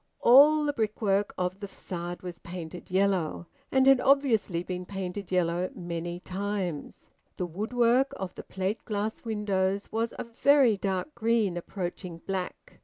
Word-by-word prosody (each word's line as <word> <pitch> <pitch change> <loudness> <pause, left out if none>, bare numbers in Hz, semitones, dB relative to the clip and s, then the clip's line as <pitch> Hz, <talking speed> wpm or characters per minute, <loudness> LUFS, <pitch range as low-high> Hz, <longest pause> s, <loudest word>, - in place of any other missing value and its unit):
All 295 +5 +7
the 290 - 0
brickwork 210 -3 0
of 180 +1 -2
the 200 - -5
facade 175 -2 -6
was 175 -2 -7
painted 175 -1 -8
yellow, 185 -3 +1 0.3
and 265 -1 +4
had 270 -2 +6
obviously 245 -11 +2
been 180 0 -4
painted 190 0 -5
yellow 180 0 +1
many 175 0 -4
times; 185 -4 -4 0.3
the 180 - -1
woodwork 235 - +2
of 185 -1 -5
the - - -8
plate 190 +3 -3
glass 215 0 -3
windows 200 -3 -1
was 225 +1 -1
a - - -3
very 250 0 +4
dark 195 +8 -2
green 225 -6 +1
approaching 175 -1 -5
black. 190 -2 -5
195 Hz, 145 wpm, -28 LUFS, 180-230 Hz, 0.3 s, All